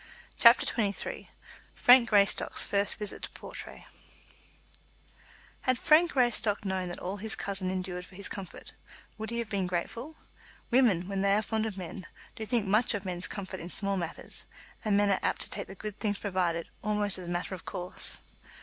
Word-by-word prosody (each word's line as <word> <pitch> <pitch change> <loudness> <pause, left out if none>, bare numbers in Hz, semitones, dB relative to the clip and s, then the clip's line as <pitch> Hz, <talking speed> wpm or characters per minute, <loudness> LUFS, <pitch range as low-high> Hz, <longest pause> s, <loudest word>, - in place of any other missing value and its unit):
CHAPTER 235 +1 +7
XXIII 205 -4 -2 0.5
Frank 245 -1 +6
Greystock's 200 -2 +3
First 200 0 +2
Visit 210 -2 -5
to - - -5
Portray - - -9 1.8
Had 255 -1 +1
Frank 320 +7 +4
Greystock 230 -5 +1
known 185 -2 -2
all 190 +3 -5
that - - -11
his 220 0 0
cousin 195 -2 -2
endured 185 -1 -4
for 185 - -15
his 200 - -4
comfort, 195 -3 -9 0.5
would 220 0 -4
he 235 - -3
have 235 -3 -3
been 195 -3 -1
grateful? 230 - -4 0.6
Women, 225 -9 +3
when 195 -1 -2
they 200 0 +3
are 215 - +1
fond 220 0 -1
of 205 -3 -6
men, 185 0 -7 0.3
do 220 - -5
think 235 -3 +1
much 220 +4 +2
of 200 -1 -5
men's 180 -1 -1
comfort 190 -2 -6
in 170 - -7
small 200 +1 -1
matters, 170 -3 -5 0.4
and 210 -3 +2
men 205 0 +3
are 190 - +2
apt - - -1
to - - -3
take - - -3
the 195 - -10
good 210 +1 -7
things 205 -2 0
provided 180 -5 -1 0.2
almost 210 -2 +1
as 180 - -8
a - - -4
matter 175 +2 -3
of 185 - -8
course. 180 0 +4
200 Hz, 185 wpm, -29 LUFS, 185-220 Hz, 1.8 s, CHAPTER